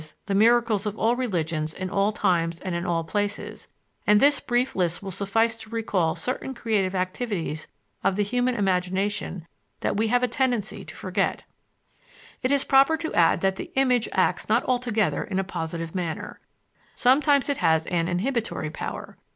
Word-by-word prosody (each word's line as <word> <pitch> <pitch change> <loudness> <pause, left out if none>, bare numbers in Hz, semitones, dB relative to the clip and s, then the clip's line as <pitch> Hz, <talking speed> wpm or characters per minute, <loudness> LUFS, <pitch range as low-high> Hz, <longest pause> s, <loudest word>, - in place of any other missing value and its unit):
the 200 - -2
miracles 225 0 +3
of 210 +1 -4
all 230 +2 +2
religions 165 -10 -2
in 185 - -4
all 200 +2 +1
times 170 -5 0
and 185 -2 -4
in 170 0 -2
all 165 -1 0
places; 205 +4 -3 0.4
and 210 0 +6
this 285 +2 +4
brief 245 +2 0
list 180 0 0
will 195 - -5
suffice 215 +4 +1
to 220 -1 -11
recall 205 -8 0
certain 265 +1 -4
creative 205 -5 0
activities 185 -4 -3 0.4
of 195 0 +2
the 205 - +1
human 245 +4 0
imagination 190 -1 -1 0.4
that - - 0
we 220 +1 +2
have 245 +2 +2
a - - +4
tendency 240 -4 -1
to - - -11
forget. - - -1 1.0
It 255 - 0
is 280 -1 +3
proper 275 +4 +4
to 320 0 -4
add 170 -1 +4
that 190 0 +1
the - - -7
image 250 -3 +2
acts 190 - +1
not 225 +3 +3
altogether 245 -4 0
in 190 - -4
a 195 - +1
positive 165 -3 -5
manner. 175 -4 -4 0.6
Sometimes 280 +2 +4
it 285 -2 0
has 160 0 +2
an 170 -2 0
inhibitory 205 - -2
power. - - -6
205 Hz, 170 wpm, -25 LUFS, 180-245 Hz, 1.0 s, and